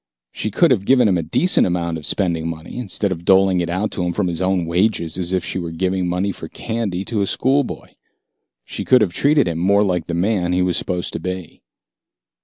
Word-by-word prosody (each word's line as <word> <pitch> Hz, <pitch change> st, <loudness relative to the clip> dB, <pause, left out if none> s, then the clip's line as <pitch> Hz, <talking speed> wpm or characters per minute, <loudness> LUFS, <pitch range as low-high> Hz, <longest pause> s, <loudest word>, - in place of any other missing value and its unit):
She 110 Hz, -, -3 dB
could 155 Hz, -, +3 dB
have 100 Hz, -6 st, +1 dB
given 125 Hz, -3 st, +5 dB
him 90 Hz, -3 st, +2 dB
a -, -, 0 dB
decent 90 Hz, -, +2 dB
amount 85 Hz, -2 st, -2 dB
of 75 Hz, -, -1 dB
spending 85 Hz, -5 st, 0 dB
money, 85 Hz, +7 st, -7 dB
instead 105 Hz, -5 st, 0 dB
of 85 Hz, -2 st, -4 dB
doling 95 Hz, 0 st, +4 dB
it 85 Hz, -, -3 dB
out 95 Hz, +5 st, -1 dB
to 90 Hz, -, -3 dB
him 90 Hz, 0 st, -1 dB
from 95 Hz, -1 st, -1 dB
his 85 Hz, +1 st, -4 dB
own 95 Hz, -2 st, +1 dB
wages 85 Hz, -1 st, 0 dB
as 90 Hz, -1 st, -2 dB
if 95 Hz, -2 st, -1 dB
she -, -, -3 dB
were 85 Hz, -2 st, -4 dB
giving 90 Hz, +2 st, -1 dB
money 90 Hz, +3 st, -1 dB
for 80 Hz, -, -8 dB
candy 105 Hz, -3 st, -4 dB
to 110 Hz, -4 st, -2 dB
a 100 Hz, -, 0 dB
schoolboy. 135 Hz, +5 st, 0 dB, 0.8 s
She -, -, -5 dB
could 130 Hz, -2 st, +4 dB
have 95 Hz, -5 st, +1 dB
treated 145 Hz, -, +3 dB
him 85 Hz, -1 st, -2 dB
more 100 Hz, +3 st, +3 dB
like 90 Hz, -4 st, -1 dB
the 85 Hz, -, -3 dB
man 90 Hz, -1 st, 0 dB
he 90 Hz, 0 st, +2 dB
was 90 Hz, -2 st, 0 dB
supposed 90 Hz, -1 st, -2 dB
to -, -, -3 dB
be. 90 Hz, 0 st, -6 dB
90 Hz, 225 wpm, -20 LUFS, 85-100 Hz, 0.8 s, given